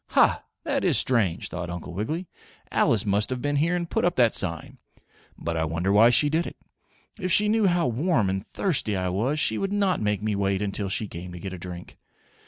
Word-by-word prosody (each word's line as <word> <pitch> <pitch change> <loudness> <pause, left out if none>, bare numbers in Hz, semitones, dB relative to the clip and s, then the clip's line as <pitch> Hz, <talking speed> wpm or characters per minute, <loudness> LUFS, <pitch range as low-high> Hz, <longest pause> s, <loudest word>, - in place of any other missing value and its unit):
"Ha! - - +4 0.2
That - - -1
is - - +3
strange," 105 -10 +1
thought 90 -1 -5
Uncle 85 0 -6
Wiggily. 155 - -3 0.4
"Alice 110 -2 +2
must 100 +1 +1
have 130 -1 -3
been 145 +3 -1
here 165 +5 +2
and 175 -1 -2
put - - -1
up 175 0 +2
that 120 -3 +4
sign. 85 -4 0 0.6
But 85 +1 -3
I 80 - 0
wonder 85 +4 -1
why 110 +4 +6
she 125 +5 +3
did 160 +3 0
it? - - -9 0.6
If 185 -2 -2
she 210 +4 +4
knew 215 -1 +3
how 175 -1 +2
warm 125 - +1
and 95 +1 -2
thirsty 135 - -1
I 90 -1 -1
was 120 +12 0
she 110 -6 +2
would 195 - -2
not 200 -2 +1
make 105 -1 -1
me 105 -1 0
wait 100 -1 0
until 100 -1 -3
she 105 +2 0
came 90 0 -8
to 90 - -8
get 95 +2 -6
a 90 - -7
drink. 90 0 -9
105 Hz, 220 wpm, -25 LUFS, 95-155 Hz, 0.6 s, why